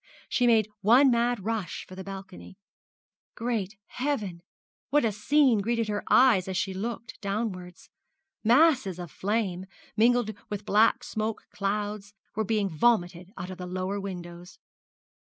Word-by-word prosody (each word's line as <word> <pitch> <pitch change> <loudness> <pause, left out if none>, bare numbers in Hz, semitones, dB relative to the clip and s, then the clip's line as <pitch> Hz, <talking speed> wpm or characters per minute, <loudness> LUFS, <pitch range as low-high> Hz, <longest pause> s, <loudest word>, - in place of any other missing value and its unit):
She 245 - +2
made 220 -3 +4
one 250 +6 +6
mad 235 -3 +1
rush 220 -4 -3
for - - -12
the 190 - -7
balcony. 190 -1 -9 0.8
Great 220 -4 -2
Heaven, 215 -11 -3 0.5
what 290 -2 +3
a 220 - +2
scene 245 +3 +3
greeted 230 +1 -1
her 205 -1 -2
eyes 230 -8 +5
as 190 -1 -2
she 190 0 -1
looked 230 +4 -6
downwards! 195 -4 -4 0.6
Masses 245 - +4
of 175 -3 -7
flame, 195 -3 -2 0.3
mingled 235 0 +3 0.2
with 205 0 -5
black 215 +2 +3
smoke 215 0 -3
clouds, 205 +1 -3 0.2
were 220 - 0
being 210 -1 0
vomited 180 -1 +1
out 185 -1 -6
of 185 - -9
the 180 - -5
lower 185 +2 -3
windows. 175 -2 -8
210 Hz, 140 wpm, -27 LUFS, 190-230 Hz, 0.8 s, one